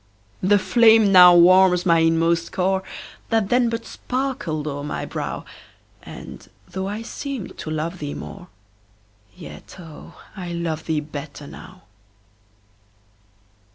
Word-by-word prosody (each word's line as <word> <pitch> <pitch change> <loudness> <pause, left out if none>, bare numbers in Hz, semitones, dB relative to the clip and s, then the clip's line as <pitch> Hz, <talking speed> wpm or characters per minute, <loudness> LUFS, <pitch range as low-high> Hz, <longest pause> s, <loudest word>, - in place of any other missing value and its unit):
The 205 +3 +4
flame 220 0 +4
now 180 -2 +8
warms 180 +1 +5
my 170 -2 +4
inmost 165 +1 +1
core, 190 +1 0 0.5
That 220 -3 +1
then 245 -1 +2
but 230 0 -4
sparkled 250 - -4
o'er 145 -1 -4
my 150 - -4
brow, - - -5 0.6
And, - - -11 0.2
though 190 +1 -5
I 210 +3 -5
seemed 265 -2 -6
to - - -6
love 160 +3 -4
thee 145 -1 -5
more, 185 -2 -9 0.9
Yet, 75 -2 -12
oh, 165 -4 -13 0.2
I 180 -3 -6
love 165 -2 -4
thee 155 -2 0
better 145 -1 -9
now. 185 +5 -13
180 Hz, 125 wpm, -22 LUFS, 160-200 Hz, 0.9 s, now